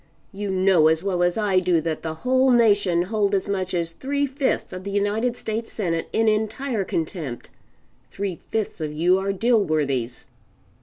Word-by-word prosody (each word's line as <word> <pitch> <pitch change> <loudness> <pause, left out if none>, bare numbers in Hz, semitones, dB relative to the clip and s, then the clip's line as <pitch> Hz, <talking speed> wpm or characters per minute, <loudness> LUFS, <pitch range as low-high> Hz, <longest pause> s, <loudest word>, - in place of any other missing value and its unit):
You 205 +1 -4
know 185 -4 +4
as 160 +2 +2
well 185 -3 -1
as 175 +2 +2
I 200 -4 +2
do 180 -2 +2
that 160 0 -3
the 160 -1 -4
whole 260 +1 +4
nation 205 -8 +3
hold 205 +1 0
as 195 - -1
much 190 -2 -2
as 170 -1 -1
three 280 +10 -1
fifths 270 -6 -2
of 185 0 -7
the 200 - -5
United 210 +5 0
States 225 +1 -4
Senate 165 -6 -2
in 225 0 +1
entire 220 +2 0
contempt. 160 -8 -4 0.6
Three 195 -2 -4
fifths 215 -1 -4
of 155 -1 -2
you 175 +5 +2
are 195 +1 -1
Dilworthys." 155 - 0
195 Hz, 170 wpm, -23 LUFS, 170-220 Hz, 0.6 s, know